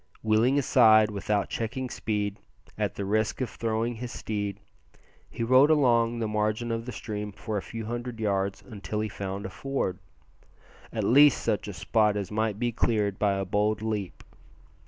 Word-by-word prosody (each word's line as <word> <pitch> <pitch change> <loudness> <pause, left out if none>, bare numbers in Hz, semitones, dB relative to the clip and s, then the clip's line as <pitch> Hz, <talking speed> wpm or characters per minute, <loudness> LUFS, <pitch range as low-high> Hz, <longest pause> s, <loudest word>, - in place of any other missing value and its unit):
Wheeling 110 +5 +3
aside 110 -6 +5
without 105 0 -1
checking 125 +3 -3
speed, 105 -2 -2 0.4
at - - -2
the 100 - -3
risk 110 +2 0
of 130 - -2
throwing 115 +1 -1
his 120 +1 -6
steed, 105 -2 -4 0.7
he - - -4
rode 130 +5 +6
along 120 -6 +3
the 115 -1 -1
margin 110 +2 -1
of 115 +1 -3
the - - -3
stream 105 -2 -5
for 110 +2 -5
a 100 - 0
few 115 +2 -7
hundred 120 +1 -5
yards 100 -2 -1
until 105 -2 -5
he 110 - -2
found 100 0 -5
a - - -4
ford 135 -10 -3 0.9
at - - -2
least 145 +3 +6
such 105 - -1
a 105 - -5
spot 105 +1 +1
as 100 -1 -4
might 110 -1 0
be 120 +1 0
cleared 105 -4 0
by 100 -2 +2
a 95 0 -2
bold 105 +3 0
leap. 105 -4 -3
110 Hz, 175 wpm, -27 LUFS, 105-120 Hz, 0.9 s, rode